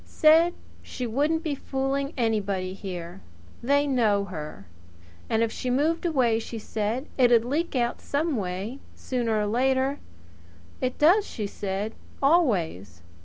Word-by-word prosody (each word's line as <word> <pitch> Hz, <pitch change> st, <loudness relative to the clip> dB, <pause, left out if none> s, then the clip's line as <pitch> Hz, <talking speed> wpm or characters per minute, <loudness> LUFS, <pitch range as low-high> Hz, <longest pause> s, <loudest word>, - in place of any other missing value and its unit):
Said 325 Hz, +3 st, +4 dB, 0.3 s
she 250 Hz, -, -5 dB
wouldn't 295 Hz, +8 st, 0 dB
be 310 Hz, -4 st, -1 dB
fooling 275 Hz, +1 st, -2 dB
anybody 200 Hz, -5 st, 0 dB
here. 180 Hz, -2 st, -7 dB, 0.4 s
They 285 Hz, +4 st, +3 dB
know 220 Hz, -7 st, +2 dB
her. 155 Hz, -, -7 dB, 0.6 s
And 225 Hz, 0 st, +2 dB
if 225 Hz, -, 0 dB
she 255 Hz, -, -4 dB
moved 315 Hz, +7 st, +1 dB
away, 250 Hz, -8 st, +2 dB
she 230 Hz, 0 st, -6 dB
said, 220 Hz, +4 st, -2 dB
it'd 240 Hz, -2 st, +5 dB
leak 300 Hz, +5 st, -1 dB
out 240 Hz, -1 st, 0 dB
some 300 Hz, +1 st, -1 dB
way 200 Hz, +5 st, -4 dB, 0.2 s
sooner 235 Hz, -4 st, -1 dB
or 210 Hz, -, +1 dB
later. 260 Hz, +5 st, +1 dB, 0.8 s
It 255 Hz, 0 st, -1 dB
does, 365 Hz, +8 st, +5 dB
she 215 Hz, -, -4 dB
said. 200 Hz, +2 st, -3 dB, 0.3 s
Always! 180 Hz, -, +1 dB
240 Hz, 135 wpm, -26 LUFS, 205-280 Hz, 0.8 s, it'd